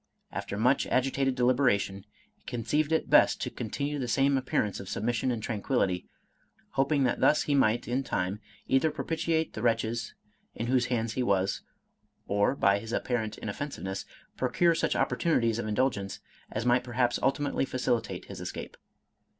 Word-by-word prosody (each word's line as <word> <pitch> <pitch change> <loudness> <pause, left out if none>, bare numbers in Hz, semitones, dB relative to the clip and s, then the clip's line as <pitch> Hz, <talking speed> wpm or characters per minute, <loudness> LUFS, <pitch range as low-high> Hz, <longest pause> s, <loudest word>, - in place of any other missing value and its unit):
After 100 - -4
much 125 +6 +3
agitated 135 0 +1
deliberation, 120 -6 +2 0.3
he - - -39
conceived 145 +6 0
it 160 - 0
best - - +6
to - - -2
continue 140 +6 -3
the 125 - -2
same 135 +3 +3
appearance 125 -6 0
of 95 - -8
sub - - -3
mission 120 +2 0
and 115 -3 -2
tranquillity, 100 -5 -1 0.6
hoping 140 +1 +2
that 125 - +1
thus 150 - +4
he 145 - 0
might 120 -4 +2
in 125 +3 0
time 95 -4 -2 0.3
either 135 +4 +3
propitiate 160 +1 -1
the 110 - -5
wretches 115 0 0 0.4
in 115 - -3
whose 125 0 +2
hands 115 -2 -1
he 130 - -1
was, 100 -4 +1 0.6
or, 100 +6 +2
by 100 -5 +3
his 115 +2 -8
apparent 110 -4 -1
inoffensiveness, 100 -4 -5 0.3
procure 170 -1 +3
such 165 - 0
opportunities 115 -9 +1
of 115 - -3
indulgence, 105 -3 -1 0.3
as 110 +2 -3
might 125 0 +3
perhaps 120 0 0
ultimately 135 +2 +1
facilitate 125 -3 -1
his - - -8
es - - -4
cape. - - -8
120 Hz, 160 wpm, -29 LUFS, 110-135 Hz, 0.6 s, best